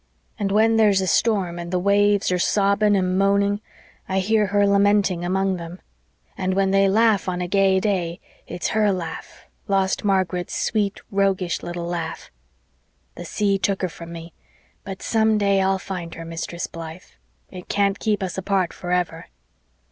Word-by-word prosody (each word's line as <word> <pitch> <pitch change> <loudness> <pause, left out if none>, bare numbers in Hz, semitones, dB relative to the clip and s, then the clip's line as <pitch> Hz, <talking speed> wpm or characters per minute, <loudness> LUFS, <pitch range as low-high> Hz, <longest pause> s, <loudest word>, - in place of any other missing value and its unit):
And 195 -1 -1
when 225 +2 +3
there's 210 -3 +4
a 190 - 0
storm 185 -2 +1
and 170 0 -6
the 180 - 0
waves 200 +1 +2
are 180 - +1
sobbing 200 +2 +2
and 185 -1 +1
moaning 200 +1 +2 0.5
I 190 - 0
hear 210 +2 +2
her 205 +1 +2
lamenting 200 -2 +2
among 190 +1 0
them. 170 +1 -8 0.6
And 185 0 -1
when 195 0 +2
they 195 0 +4
laugh 215 -2 +3
on 180 0 -3
a 180 - -2
gay 195 0 +3
day 180 -4 -1 0.3
it's 175 - -3
HER 215 -2 +2
laugh 170 -4 -6 0.2
lost 195 -1 +1
Margaret's 185 -3 0
sweet, 205 -3 -1
roguish, 195 -3 0
little 175 0 -5
laugh. 170 -2 -5 0.8
The 175 - -9
sea 200 +3 0
took 195 -1 -1
her 185 - 0
from 170 +1 -10
me, 165 -1 -9 0.5
but 195 -1 -8
some 220 -1 +2
day 200 -1 +2
I'll 190 0 +2
find 180 -3 -6
her. 165 - -8
Mistress 165 +1 -5
Blythe. 165 +1 -9 0.5
It 180 -1 -10
can't 200 0 +1
keep 210 -2 0
us 185 0 -3
apart 190 -2 0
forever." 175 -2 -2
190 Hz, 165 wpm, -22 LUFS, 180-200 Hz, 0.8 s, there's